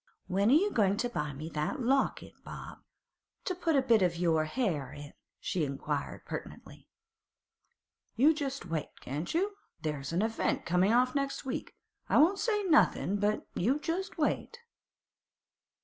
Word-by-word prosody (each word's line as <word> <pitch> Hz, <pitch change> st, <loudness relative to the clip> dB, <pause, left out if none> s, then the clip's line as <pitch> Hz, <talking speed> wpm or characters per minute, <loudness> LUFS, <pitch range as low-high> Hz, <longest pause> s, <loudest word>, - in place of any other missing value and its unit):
'When 200 Hz, +3 st, +2 dB
are -, -, +6 dB
you 400 Hz, +6 st, +3 dB
goin' 200 Hz, -2 st, +2 dB
to 245 Hz, +2 st, 0 dB
buy 150 Hz, -10 st, -2 dB
me 145 Hz, +3 st, -7 dB
that 155 Hz, -, -2 dB
locket, 270 Hz, +3 st, +1 dB
Bob, -, -, -9 dB, 0.7 s
to 370 Hz, -, 0 dB
put 335 Hz, -3 st, 0 dB
a 270 Hz, -, +4 dB
bit 230 Hz, -5 st, +4 dB
of 175 Hz, -2 st, +2 dB
your 160 Hz, -3 st, +2 dB
'air 160 Hz, -, 0 dB
in?' 145 Hz, 0 st, -10 dB, 0.3 s
she 175 Hz, -, -1 dB
inquired 140 Hz, +1 st, -3 dB
pertinently. -, -, -8 dB, 1.3 s
'You 285 Hz, +7 st, +5 dB
just 275 Hz, -, -4 dB
wait, 165 Hz, -3 st, -4 dB
can't 145 Hz, +6 st, -4 dB
you? 395 Hz, +4 st, 0 dB, 0.3 s
There's 150 Hz, -2 st, -3 dB
a 180 Hz, +6 st, +1 dB
event 225 Hz, 0 st, -1 dB
coming 180 Hz, +4 st, +3 dB
off 250 Hz, +2 st, +3 dB
next 275 Hz, -1 st, -2 dB
week. 260 Hz, -, -4 dB, 0.3 s
I -, -, +4 dB
won't 355 Hz, +7 st, +5 dB
say 420 Hz, -3 st, +1 dB
nothing, 305 Hz, -, +3 dB
but 205 Hz, +1 st, 0 dB
you 245 Hz, +10 st, +1 dB
just 360 Hz, +6 st, -3 dB
wait. 325 Hz, +8 st, -1 dB
220 Hz, 155 wpm, -31 LUFS, -, 1.3 s, are